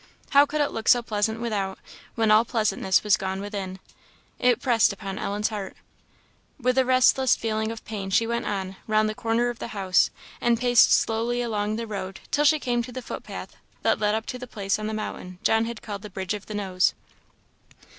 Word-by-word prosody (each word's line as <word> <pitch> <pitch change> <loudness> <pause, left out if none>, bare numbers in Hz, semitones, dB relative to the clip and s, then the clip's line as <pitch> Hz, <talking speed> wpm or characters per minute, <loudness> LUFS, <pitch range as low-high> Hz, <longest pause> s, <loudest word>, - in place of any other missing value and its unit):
How 285 +1 +6
could 300 +1 -1
it 290 - +1
look 225 - -5
so 245 -1 +6
pleasant 220 0 -1
without, 205 -5 -2 0.4
when 220 -2 +2
all 215 +1 +6
pleasantness 215 -5 +1
was 210 0 +4
gone 190 -1 -3
within? 195 -2 -5 0.6
It 250 -1 +3
pressed 235 -5 +3
upon 195 0 -6
Ellen's 205 +1 -1
heart. 205 -3 -6 0.8
With 255 0 +2
a 260 - +3
restless 255 0 +4
feeling 220 0 -2
of 225 - -9
pain, 200 -3 -5
she 220 +4 +3
went 235 +1 -2
on, 190 -2 -3
round 215 0 +3
the 215 - -2
corner 230 +2 0
of 240 - -12
the - - -4
house, 190 -2 +3 0.3
and 235 -1 +2
paced 245 -1 +5
slowly 235 +2 +2
along 210 -2 -1
the 230 +1 -3
road 195 -3 -5
till 295 +1 +2
she 310 +2 +5
came 245 -4 0
to 245 +2 -7
the 255 +1 -6
footpath - - -7 0.3
that - - +2
led 210 0 +2
up 220 0 -3
to 250 -2 -5
the 250 - -7
place 200 -3 -2
on 215 - -3
the 220 - -3
mountain 185 -4 -6
John 225 0 +3
had 230 -1 -6
called 205 -3 -6
the 210 - -8
Bridge 190 +1 -3
of 205 -1 -7
the 215 - -6
Nose. 190 -3 +1
220 Hz, 205 wpm, -25 LUFS, 200-240 Hz, 0.8 s, How